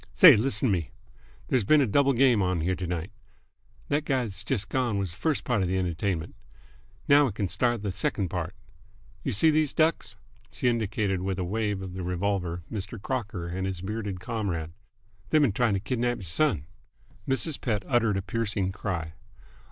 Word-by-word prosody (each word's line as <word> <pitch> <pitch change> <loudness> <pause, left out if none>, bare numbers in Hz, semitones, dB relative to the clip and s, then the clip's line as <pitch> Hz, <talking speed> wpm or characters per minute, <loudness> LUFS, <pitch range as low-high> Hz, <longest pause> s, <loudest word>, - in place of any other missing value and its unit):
"Say, 165 -8 +9
list'n 130 +3 +1
t' - - +3
me. 85 -5 -1 0.6
There's 130 -4 +2
been 150 +10 +5
a 140 - +4
double 140 +5 +3
game 125 -4 +4
on 90 -3 0
here 90 +4 +1
t'night. 90 -1 -4 0.8
That 145 +1 +1
guy 135 -4 +1
that's 100 -5 -6
jus' 110 -7 -1
gone 120 -3 0
was 95 -3 -2
th' - - -13
first 160 -3 0
part 120 -5 +1
of 95 - +1
th' 90 - -1
entertainment. 90 -1 -2 0.7
Now 145 0 +6
we 125 - -1
c'n 100 0 -2
start 120 +2 0
th' 100 -3 -2
sec'nd 95 +1 -1
part. 90 0 -4 0.7
You - - -1
see 155 +11 +4
these 155 -2 +1
ducks?" 155 -9 +1 0.4
She 125 - -2
indicated 105 -5 0
with 95 -1 -2
a 95 - -1
wave 105 +1 -1
of 95 -2 -7
the 95 - -5
revolver 90 -1 -2
Mr. 105 +1 -5
Crocker 105 -7 -3
and 95 +2 -2
his 95 -2 -4
bearded 105 -2 -4
comrade. 95 -8 -3 0.6
"They've 155 - +4
been 140 -7 +4
trying 110 0 +1
t' - - 0
kidnap 120 +3 -1
y'r - - -9
son!" 85 - +1 0.6
Mrs. 135 +3 0
Pett 105 -5 -1
uttered 115 -5 +2
a 95 - -2
piercing 100 -2 -1
cry. 85 -5 -4
100 Hz, 190 wpm, -27 LUFS, 95-120 Hz, 0.8 s, Say